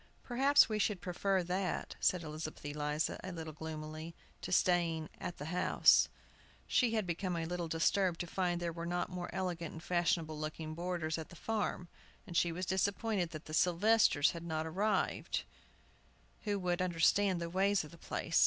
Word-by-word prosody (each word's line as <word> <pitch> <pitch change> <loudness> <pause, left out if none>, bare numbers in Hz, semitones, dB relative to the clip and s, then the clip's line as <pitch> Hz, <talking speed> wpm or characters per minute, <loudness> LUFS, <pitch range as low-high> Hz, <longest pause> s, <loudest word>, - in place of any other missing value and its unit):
"Perhaps 270 +4 +5
we 215 -3 -1
should 210 -2 +1
prefer 185 +1 0
that," 185 +2 -2
said 180 -2 +2
Elizabeth 155 0 -6
Eliza, 150 +1 -1
a 190 - -5
little 160 -2 -6
gloomily, 155 +1 -6 0.3
"to - - -5
staying 170 -3 +2
at 175 - -5
the 155 +4 -5
house." 180 - +5 0.6
She 235 -3 +2
had 215 -3 +1
been 180 +1 -2
a 165 -1 -2
little 175 0 -3
disturbed 165 +2 +2
to - - -3
find 175 0 -1
there 170 -1 -2
were 170 0 -5
not 175 +1 -1
more 180 -1 -4
elegant 175 -3 -3
and 160 - -9
fashionable 165 -3 0
looking 155 +1 -4
boarders 170 -1 -2
at 160 - -7
the - - -12
farm, 210 -2 -2 0.4
and 175 - -9
she 170 0 +3
was 180 +3 -3
disappointed 195 0 0
that 155 -1 -8
the 155 - -8
Sylvesters 180 -2 +4
had 170 - -7
not 160 -1 -2
arrived, 195 +7 0 1.0
who 205 -1 0
would 180 -1 0
understand 185 +2 +3
the 170 - -3
ways 195 +1 +2
of 150 - -11
the 170 - -14
place. 165 0 0
175 Hz, 175 wpm, -34 LUFS, 160-185 Hz, 1.0 s, Perhaps